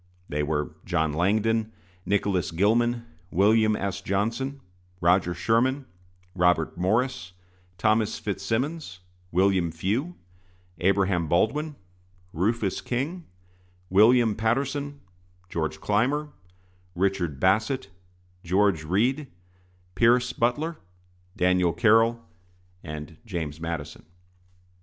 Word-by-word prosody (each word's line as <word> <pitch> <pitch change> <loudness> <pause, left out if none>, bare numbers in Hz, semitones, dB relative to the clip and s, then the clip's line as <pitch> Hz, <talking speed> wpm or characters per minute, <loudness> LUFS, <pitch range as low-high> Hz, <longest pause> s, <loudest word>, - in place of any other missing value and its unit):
They 75 +1 -1
were 75 0 -1
John 80 -4 0
Langdon, 110 +6 +1 0.3
Nicholas 100 -3 +1
Gilman, 115 +7 +1 0.2
William 110 +3 +3
S. 100 -1 -3
Johnson, 115 +9 -2 0.4
Roger 90 0 +2
Sherman, 120 - +1 0.5
Robert 90 -3 +2
Morris, 110 0 0 0.4
Thomas 110 +2 +1
Fitzsimmons, 110 - -3 0.3
William 90 -1 +2
Few, 110 - -2 0.6
Abraham 95 -2 +2
Baldwin, 145 - +1 0.6
Rufus 100 +3 0
King, 150 +8 -3 0.6
William 110 +3 +5
Paterson, 140 +6 -1 0.5
George 80 -2 -3
Clymer, 135 - 0 0.7
Richard 90 -6 0
Bassett, 110 - +1 0.5
George 95 -2 +2
Read, 120 - +1 0.7
Pierce 120 +5 +3
Butler, 145 +9 0 0.6
Daniel 90 -1 +2
Carroll, 115 -2 +3 0.6
and 75 +1 -7
James 80 -8 -5
Madison. 80 -3 -5
105 Hz, 85 wpm, -26 LUFS, 90-120 Hz, 0.7 s, William